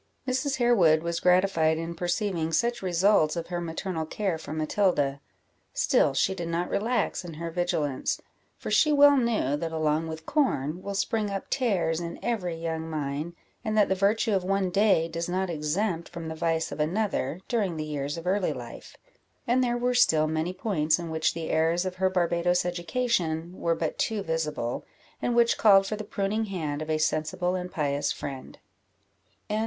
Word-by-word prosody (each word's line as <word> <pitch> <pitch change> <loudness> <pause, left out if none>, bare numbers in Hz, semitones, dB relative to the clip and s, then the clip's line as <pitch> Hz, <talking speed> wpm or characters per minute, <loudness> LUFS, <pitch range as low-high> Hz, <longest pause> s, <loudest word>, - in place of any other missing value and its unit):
Mrs. 260 +2 0
Harewood 185 -11 +4
was 170 0 -2
gratified 180 -3 +3
in 165 +1 -4
perceiving 175 -1 -1
such 235 +8 +1
results 180 -3 +3
of 170 -1 -4
her 175 -1 -2
maternal 165 0 -4
care 190 -3 -2
for - - -9
Matilda: 155 -3 0 0.5
still 135 - +3
she 190 - +2
did 175 -3 -5
not 170 +1 -2
relax 230 -1 0
in 170 -3 -8
her 165 +1 -5
vigilance; 165 -6 -1 0.4
for - - -6
she 305 - +4
well 285 0 +7
knew, 230 - +1
that 165 +2 -3
along 155 0 0
with 160 0 -7
corn 175 - 0
will 200 +1 -5
spring 210 +1 0
up 195 -1 -5
tares 190 -11 +1
in 170 -1 -5
every 190 -8 -1
young 165 0 -4
mind, 150 +2 -3 0.3
and 215 -2 -1
that 210 - +4
the - - +3
virtue 205 +4 +1
of 190 -2 +1
one 195 0 0
day 195 -4 +3
does 170 +1 -4
not 185 0 -1
exempt 165 +3 -1
from 170 -2 -6
the - - -4
vice 165 0 -1
of 145 - -6
another, 175 -2 -1
during 200 -9 0
the 155 - -3
years 145 0 -3
of 165 - -7
early 190 +1 +1
life; - - -10 0.5
and 250 +2 +2
there 240 -1 0
were 245 +1 0
still 160 -10 +4
many 160 +2 -1
points 180 -5 +1
in 170 -2 -6
which 160 0 0
the 165 -1 -4
errors 165 +3 +2
of 185 0 -4
her 190 0 +2
Barbadoes 175 -1 +1
education 175 -3 -1
were 170 -2 0
but 160 -1 -3
too 220 -3 0
visible, 155 -8 -2 0.4
and 240 - 0
which 235 -1 +3
called 195 -3 +6
for 215 - -2
the 215 - -6
pruning 205 +2 -1
hand 155 -7 -3
of 155 - -5
a 155 - +2
sensible 165 +4 0
and 180 -1 -4
pious 145 -4 0
friend. 135 -2 -7
175 Hz, 180 wpm, -27 LUFS, 160-200 Hz, 0.5 s, well